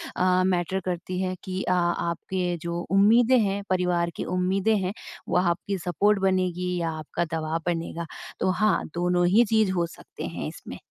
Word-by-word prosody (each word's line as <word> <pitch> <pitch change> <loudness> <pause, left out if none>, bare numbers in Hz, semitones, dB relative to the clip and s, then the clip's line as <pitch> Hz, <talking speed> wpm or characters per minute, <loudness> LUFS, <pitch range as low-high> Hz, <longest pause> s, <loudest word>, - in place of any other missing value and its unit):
अ, 185 0 +3
matter 185 0 0
करती 180 0 -3
हैं 185 0 -1
कि 185 0 -3
अ, - - -1
आपके 175 +1 -1 0.2
जो 170 0 -3
उम्मीदें 225 +6 +5
हैं, 200 -1 0
परिवार 180 -2 +1
की - - -3
उम्मीदें 190 +4 +2
हैं, 185 0 -2 0.4
वो - - +2
आपकी 180 +2 0
सपोर्ट 200 +4 +1
बनेगी 180 -1 0
या 165 -1 -1
आपका 155 +2 -3
दबाव 160 +1 -2
बनेगा। 170 -1 -2 0.3
तो 185 - +1
हाँ, 215 +2 +2
दोनों 175 0 +2
ही 215 +6 +5
चीज़ 220 -3 +3
हो 175 -2 +1
सकते - - -11
हैं - - -5
इसमें। - - -9
180 Hz, 170 wpm, -26 LUFS, 175-195 Hz, 0.4 s, उम्मीदें